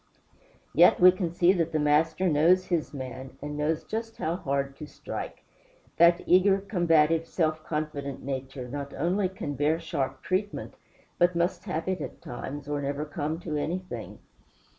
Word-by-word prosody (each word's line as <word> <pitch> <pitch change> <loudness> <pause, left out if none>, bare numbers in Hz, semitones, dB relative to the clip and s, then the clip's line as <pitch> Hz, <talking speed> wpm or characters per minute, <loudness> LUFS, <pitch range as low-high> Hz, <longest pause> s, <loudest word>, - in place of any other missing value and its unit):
Yet - - +6
we 180 +1 +9
can 180 -2 -3
see 175 +2 +4
that 165 -3 0
the - - +2
Master 155 +4 +2
knows 175 +4 +4
his 170 -4 -1
man, 130 -1 -7
and 150 +1 -5
knows 150 +2 0
just 225 +1 -5
how 160 +2 -1
hard 140 -4 -2
to 150 - -8
strike. - - -7 0.5
That 170 +1 +5
eager, 190 +2 +5
combative, 165 -5 +2
self 155 -3 0
confident 150 -3 -4
nature 135 -1 -5
not 140 +2 -6
only 180 +6 +1
can 165 -6 -5
bear 150 +4 +1
sharp 140 -5 -3
treatment, 195 +3 -2 0.5
but 175 0 +4
must 170 +2 0
have 160 +2 -3
it 185 -3 -1
at 135 - -6
times, 140 +4 -7
or 145 -1 -2
never 140 +2 -2
come 155 +1 -3
to 155 -4 -3
anything. 180 +5 -4
155 Hz, 160 wpm, -27 LUFS, 145-175 Hz, 0.5 s, we